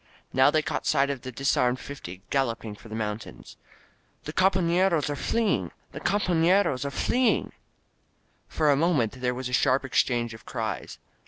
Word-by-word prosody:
Now 130 +2 +5
they 155 +1 +2
caught - - -3
sight 140 +1 +3
of 135 -3 -5
the 130 - -7
disarmed 130 -1 +1
fifty 95 -10 -9
galloping 115 -5 -1
for 110 +2 -14
the 110 - -6
mountains. 105 0 -5 0.7
"The 150 - -6
companeros 180 -4 +2
are - - -2
fleeing! 190 - 0 0.2
The - - -7
compafieros 180 -6 +2
are - - -1
fleeing!" 245 - +1 1.0
For 155 -2 +2
a - - +4
moment 135 -6 +1
there 125 -1 0
was 130 0 -4
a 125 - -7
sharp 130 +2 +3
exchange 120 -2 +1
of 110 - -12
cries. - - -4
135 Hz, 160 wpm, -26 LUFS, 120-165 Hz, 1.0 s, Now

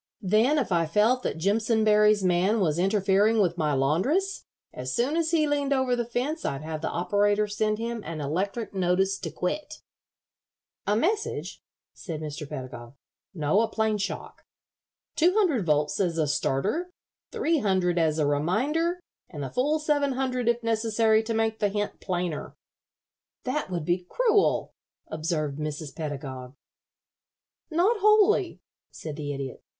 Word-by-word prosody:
Then 220 +10 +3
if 265 -8 -1
I 170 -2 +2
felt 215 +9 +3
that - - -3
Jimpsonberry's 210 +2 +3
man 185 +5 +2
was 165 -4 +1
interfering 200 +3 +3
with 175 -4 +2
my 150 -2 +1
laundress, 190 - 0 0.3
as 130 0 -4
soon 260 +6 +1
as 330 -1 +1
he 320 -2 +3
leaned 285 -1 +1
over 260 -2 +1
the 240 -1 -1
fence 260 +7 -2
I'd 140 +2 -3
have 155 -1 -5
the - - -2
operator 205 +4 +1
send 215 +1 0
him 230 0 -4
an 165 -1 -6
electric 195 +10 -2
notice 190 +1 +1
to 170 - -4
quit." 300 - -4 1.0
"A 205 - +3
message?" 410 - -1 0.3
said 165 -6 -6
Mr. 150 -1 -6
Pedagog. 130 -3 -8 0.4
"No, 155 +6 +2
a 230 - +1
plain 220 -1 0
shock. 200 - -5 0.7
Two 345 +3 +4
hundred 310 - +2
volts 150 -1 +1
as 175 -4 0
a 160 - +2
starter, 190 - -1 0.4
three 335 -9 +1
hundred 185 -5 +1
as 160 -2 +2
a 150 - +2
reminder, 260 - 0 0.3
and 150 -4 -6
the 135 - -5
full 290 +5 +1
seven 290 -3 +1
hundred 255 -2 -1
if 235 0 0
necessary 225 -1 +2
to 225 +1 -3
make 225 0 0
the 205 - +2
hint 205 +1 -3
plainer." 175 -4 -3 0.9
"That 260 -2 -2
would 175 -4 -3
be 180 +1 -1
cruel," 445 -5 +2 0.4
observed 155 -2 -2
Mrs. 150 -1 -5
Pedagog. 135 -4 -6 1.1
"Not 360 +8 +2
wholly," 425 -2 +3 0.3
said 155 -2 -7
the 145 -1 -4
Idiot. 135 -2 -6
205 Hz, 150 wpm, -26 LUFS, 160-255 Hz, 1.1 s, Two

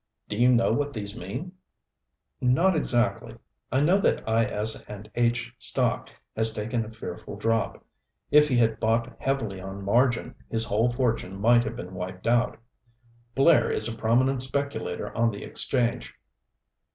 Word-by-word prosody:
"Do 105 - -4
you 120 +3 +4
know 115 -3 +3
what 145 +3 -1
these 105 -2 -5
mean 145 +9 -6 0.5
" - - -52 0.2
"Not 190 0 +3
exactly. 120 -5 +1 0.4
I 130 +3 +2
know 175 +7 +4
that 195 - 0
I. 110 +1 +3
S. 110 +1 0
and 105 0 -9
H. 120 - 0
stock - - +1 0.3
has 110 0 +2
taken 115 +2 -2
a 110 - -9
fearful 110 -1 -8
drop 115 +2 -1 0.5
if 150 0 +6
he 130 -4 +1
had 115 -2 +2
bought 115 +2 0
heavily 115 -9 -2
on 95 +1 -7
margin 120 +4 +2 0.2
his 115 -1 0
whole 110 +4 +1
fortune 115 -6 -1
might 120 +3 +4
have 115 0 -5
been 90 -3 -8
wiped 90 0 -7
out. 120 0 +2 0.8
Blair 150 +3 +5
is 110 - +1
a 115 - -4
prominent 125 +4 +1
speculator 140 +2 -2
on 115 0 +2
the 100 -2 -7
exchange. 120 - -1
115 Hz, 160 wpm, -26 LUFS, 110-125 Hz, 0.8 s, if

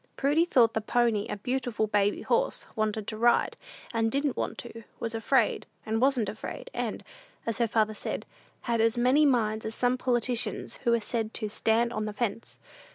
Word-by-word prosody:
Prudy 295 +5 +3
thought 235 -9 +4
the 220 - 0
pony 225 -1 +1
a - - -3
beautiful 245 0 -1
"baby 205 -1 +1
horse;" - - 0
wanted 215 -1 -1
to 215 0 -5
ride, 240 +2 +3 0.4
and 225 -1 +1
didn't 280 0 0
want - - -3
to; 230 -1 -8 0.2
was 230 -1 -3
afraid, 225 +4 +1 0.2
and 220 +1 -1
wasn't 260 -5 +3
afraid, 220 - -6
and, - - -3 0.4
as 230 0 -2
her 235 - +3
father 215 -1 +1
said, - - -4 0.4
"had 235 -2 0
as 230 +1 +2
many 260 +5 +4
minds 220 -4 +1
as 220 0 -4
some 250 0 +1
politicians 240 -3 0
who 235 - +4
are - - +1
said 225 0 -3
to 215 - 0
'stand 225 +3 +1
on 215 - -2
the 210 - -4
fence.'" 230 0 -4
230 Hz, 185 wpm, -28 LUFS, 215-245 Hz, 0.4 s, thought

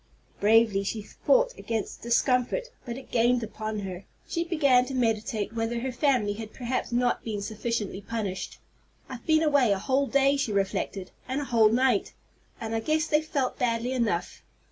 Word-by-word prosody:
Bravely 215 -1 +4
she 210 +2 -3
fought - - +2
against 225 -3 -4
the 235 - -7
discomfort, 250 - +2 0.2
but 240 -1 -5
it 270 - -12
gained 240 +1 +3
upon 215 -1 -4
her. 190 -1 -6 0.2
She 335 - -1
began 280 -7 +3
to 265 +1 -5
meditate 220 -3 0
whether 230 +1 -1
her 260 +1 -2
family 250 -6 +1
had 215 0 -8
perhaps 255 0 -2
not 245 +1 +1
been 215 -3 -3
sufficiently 215 -1 -3
punished. 200 -3 -4 0.5
"I've 255 -3 -9
been 315 0 +4
away 285 -7 +4
a 200 - +2
whole 270 +7 +1
day," 275 +1 +3
she 275 -5 -1
reflected, 195 -1 -2 0.2
"and 260 +2 -1
a 290 - -3
whole 225 -4 +4
night, 245 -2 +2 0.5
and 225 0 -4
I 225 - +1
guess 310 +7 +1
they've 305 -1 +2
felt 280 -4 -2
badly 235 0 0
enough. 225 -9 -1
235 Hz, 175 wpm, -27 LUFS, 215-265 Hz, 0.5 s, Bravely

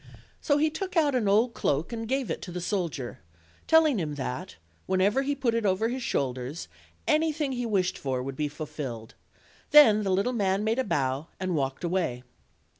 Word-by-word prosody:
So 285 - +2
he 310 +1 +2
took 375 +3 -4
out 295 -3 +3
an 240 -5 +1
old 220 +4 +3
cloak 150 - -1
and 225 -1 -4
gave 265 0 -1
it - - -3
to 180 - -7
the 180 - -4
soldier, 170 - -3 0.5
telling 315 -7 +5
him 150 -4 -3
that, 130 -2 -5 0.3
whenever 195 +7 +2
he 285 +1 -1
put 260 -4 0
it 230 -1 0
over 205 +3 +1
his 255 +2 -3
shoulders, 130 - -2 0.4
anything 305 -2 +1
he 245 -2 -2
wished 190 -4 0
for 130 -2 -2
would 135 0 -5
be 150 +2 -1
fulfilled; 145 -7 -6 0.6
then 235 -8 +7
the 200 - -1
little 195 +7 +1
man 200 -3 +1
made 225 +3 0
a - - +2
bow, 135 - -1
and 185 -2 -1
walked 135 0 -2
away. 170 -9 -1
195 Hz, 190 wpm, -27 LUFS, -, 0.6 s, then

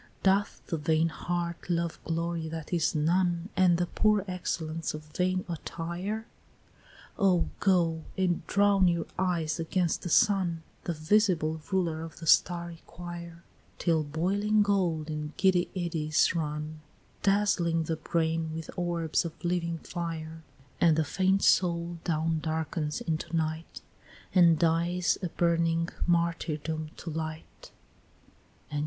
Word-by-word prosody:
"Doth 195 +1 +2
the 165 - -2
vain 160 +2 +2
heart 170 +1 -4
love 170 -1 -1
glory 165 0 -2
that 160 +1 -6
is 165 -2 +1
none, 175 +3 +1
And 180 -2 +4
the 175 - +1
poor 210 +2 +2
excellence 165 -3 -3
of 155 0 -8
vain 185 0 0
attire? 175 +5 -4 0.9
Oh 185 -4 +3
go, 170 -4 +2 0.2
and 185 -2 +1
drown 200 -2 +4
your 170 -2 +1
eyes 170 -4 0
against 170 +1 0
the 175 - -4
sun, 180 -4 +3 0.2
The 170 - -1
visible 160 -2 +2
ruler 170 -4 0
of 165 0 -8
the 165 - -7
starry 170 +1 +2
quire, 170 -1 -8 0.3
Till 165 -3 +2
boiling 200 +8 +1
gold 175 -6 0
in 150 0 -4
giddy 185 -2 +3
eddies 160 -4 +1
run, 155 -1 -3 0.4
Dazzling 195 -5 +2
the 160 +1 -1
brain 160 0 -1
with 160 -1 -6
orbs 170 -3 0
of 165 -2 -5
living 170 -1 0
fire; 165 -2 -5 0.4
And 165 -2 +5
the 160 - +3
faint 190 +5 +1
soul 170 -1 +2
down 160 -1 0
darkens 155 -1 -2
into 160 +1 -2
night, 160 +1 -3 0.5
And 170 -3 +6
dies 170 +2 +1
a 180 - -1
burning 165 0 +1 0.2
martyrdom 160 -2 0
to 165 - -6
light." 155 0 -6
170 Hz, 130 wpm, -29 LUFS, 160-180 Hz, 0.9 s, And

